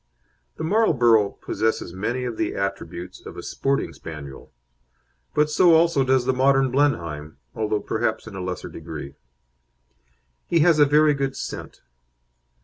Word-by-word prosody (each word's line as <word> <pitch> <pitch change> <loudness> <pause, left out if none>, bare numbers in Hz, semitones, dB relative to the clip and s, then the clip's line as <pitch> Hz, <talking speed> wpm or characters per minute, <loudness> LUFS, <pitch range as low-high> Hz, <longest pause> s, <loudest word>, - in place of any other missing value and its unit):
The - - -5
Marlborough 125 - +3
possesses 110 -5 -1
many 120 +7 -2
of 120 -2 -3
the - - -2
attributes 90 -3 -5
of - - -10
a - - -7
sporting 135 0 -1
Spaniel; 70 -4 -10 0.8
but 150 0 +4
so 165 +2 +5
also 165 -4 +3
does 130 -1 +2
the 130 - +2
modern 135 0 +3
Blenheim, 85 - -1 0.2
although 105 -1 -1
perhaps 110 +1 -2
in 110 - -10
a 95 - -5
lesser 90 0 -5
degree. 75 -4 -8 1.3
He 170 -2 +3
has 165 -1 +4
a 145 - +6
very 150 +1 +4
good 135 -1 -2
scent. - - -7
125 Hz, 145 wpm, -23 LUFS, 95-145 Hz, 1.3 s, a